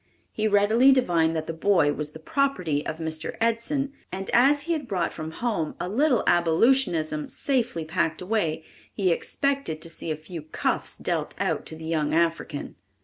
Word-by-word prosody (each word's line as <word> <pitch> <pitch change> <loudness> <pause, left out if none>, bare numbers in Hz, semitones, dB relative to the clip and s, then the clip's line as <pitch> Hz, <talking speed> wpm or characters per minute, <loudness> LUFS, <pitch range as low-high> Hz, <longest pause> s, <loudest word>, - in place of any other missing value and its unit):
He 215 0 0
readily 215 +6 +5
divined 170 -11 +2
that 160 -1 -2
the 165 - -4
boy 165 -4 +3
was 150 0 -4
the - - -8
property 180 - 0
of 155 - -4
Mr. 160 -1 -4
Edson, 235 +5 0 0.2
and 190 +1 -4
as 280 +4 +5
he 335 +2 0
had 295 -5 -3
brought 180 -5 -1
from 155 -1 -6
home 165 -3 -2
a 175 - -3
little 255 +6 +2
abolitionism 170 - +2
safely 245 - 0
packed 160 -1 -1
away, 180 -5 -1 0.3
he 190 -4 +1
expected 275 - -1
to 165 - -4
see 165 - -5
a 155 - 0
few 160 +2 -8
cuffs 155 - -2
dealt - - -2
out - - -1
to 160 - -6
the 160 0 -9
young 155 -2 0
African. 165 -3 -1
175 Hz, 175 wpm, -25 LUFS, 160-240 Hz, 0.3 s, readily